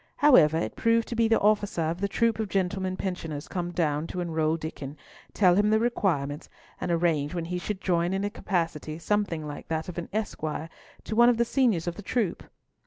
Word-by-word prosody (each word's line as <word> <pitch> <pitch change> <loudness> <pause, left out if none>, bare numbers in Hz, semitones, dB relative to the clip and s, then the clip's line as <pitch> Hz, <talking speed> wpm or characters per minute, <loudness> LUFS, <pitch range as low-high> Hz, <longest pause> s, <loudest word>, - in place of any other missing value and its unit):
However, 165 - +6
it 165 - -2
proved 230 0 +2
to 235 - -3
be 230 0 +3
the 225 - +3
officer 205 -4 +2
of 165 +3 -2
the 200 - +1
troop 225 +2 +1
of 215 -2 -2
gentlemen 185 0 -1
pensioners 165 -6 -4
come 175 -2 -3
to 160 +1 -1
enroll 160 -2 0
Diccon, 150 -3 -7 0.3
tell 185 -4 +4
him 205 +3 +3
the 215 - +4
requirements, 165 -11 -1 0.3
and - - -3
arrange 165 -3 +1
when 170 -1 -2
he 180 +1 -3
should 200 +1 -4
join 175 -1 +1
in 195 +1 -1
a 205 - -1
capacity 165 -6 -2
something 170 -3 -1
like 145 -1 -7
that 160 +1 -2
of 175 - -5
an 170 - -6
esquire 160 -7 -3 0.3
to 215 - -4
one 240 +1 +7
of 240 - +2
the 235 - +3
seniors 230 - +2
of 175 -1 -3
the - - -6
troop. 205 -2 -1
180 Hz, 205 wpm, -27 LUFS, 160-210 Hz, 0.3 s, one